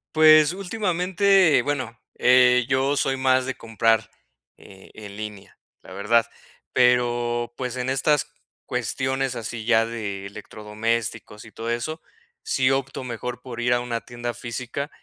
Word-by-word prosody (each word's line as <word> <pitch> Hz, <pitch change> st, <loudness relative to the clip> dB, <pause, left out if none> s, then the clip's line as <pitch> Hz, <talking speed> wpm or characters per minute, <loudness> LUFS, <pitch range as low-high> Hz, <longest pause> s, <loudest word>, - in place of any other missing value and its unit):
Pues, 155 Hz, 0 st, +7 dB
últimamente, 190 Hz, -, +2 dB
bueno, 130 Hz, -4 st, -3 dB, 0.2 s
eh, 125 Hz, 0 st, +5 dB
yo 135 Hz, +1 st, +1 dB
soy 135 Hz, -1 st, +1 dB
más 130 Hz, -1 st, +2 dB
de 135 Hz, -, -2 dB
comprar 115 Hz, 0 st, +1 dB, 0.5 s
eh, 95 Hz, -1 st, -16 dB
en 105 Hz, -2 st, -10 dB
línea, 105 Hz, -2 st, -9 dB, 0.2 s
la -, -, -12 dB
verdad, 110 Hz, +4 st, +2 dB, 0.5 s
pero, 120 Hz, -1 st, +2 dB
pues, 125 Hz, -1 st, -4 dB
en 125 Hz, +1 st, -2 dB
estas 150 Hz, +2 st, +1 dB, 0.3 s
cuestiones 130 Hz, +2 st, -2 dB
así 115 Hz, -1 st, -6 dB
ya 115 Hz, -1 st, +4 dB
de 105 Hz, -4 st, -5 dB
electrodomésticos 105 Hz, +2 st, -4 dB
y 110 Hz, -, -14 dB
todo 115 Hz, +2 st, -6 dB
eso, 120 Hz, +8 st, -3 dB, 0.4 s
sí 130 Hz, 0 st, +1 dB
opto 135 Hz, 0 st, -2 dB
mejor 125 Hz, 0 st, -5 dB
por 120 Hz, -2 st, -7 dB
ir 120 Hz, +1 st, +1 dB
a 120 Hz, -, +1 dB
una 120 Hz, -1 st, -3 dB
tienda 120 Hz, 0 st, -6 dB
física 125 Hz, +5 st, -5 dB
125 Hz, 140 wpm, -23 LUFS, 115-135 Hz, 0.5 s, Pues